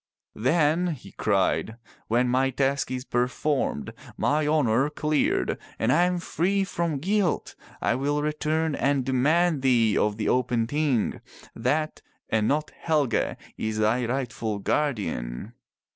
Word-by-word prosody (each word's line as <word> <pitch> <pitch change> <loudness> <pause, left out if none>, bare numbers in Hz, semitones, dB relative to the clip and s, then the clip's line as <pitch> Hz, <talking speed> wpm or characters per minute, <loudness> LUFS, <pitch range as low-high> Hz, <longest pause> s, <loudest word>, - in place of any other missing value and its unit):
"Then," 155 +7 +2
he 130 - -14
cried, 105 +2 0 0.3
'*when 120 +3 +2
my 130 +2 +2
task 135 +2 0
is 130 0 -4
performed, 125 - -1 0.2
my 150 +1 +1
honor 140 -3 +2
cleared, 150 0 0 0.2
and 115 +3 +2
I 175 +5 +4
am 180 0 0
free 185 +3 0
from 170 -5 -2
guilt, 190 +3 0 0.3
I - - +2
will 145 +3 0
return 155 +1 0
and 140 -2 +1
demand 150 +4 +2
thee 115 -5 +3
of 105 0 +1
the 110 - -2
open 125 -2 +1
Ting. 140 -2 0 0.3
That 155 +1 -1 0.3
and 110 -1 +2
not 150 +2 0
Helge 150 -8 0 0.2
is 110 0 -2
thy 110 +3 +1
rightful 115 -4 -2
guardian." 100 - -2
135 Hz, 130 wpm, -26 LUFS, 115-155 Hz, 0.3 s, I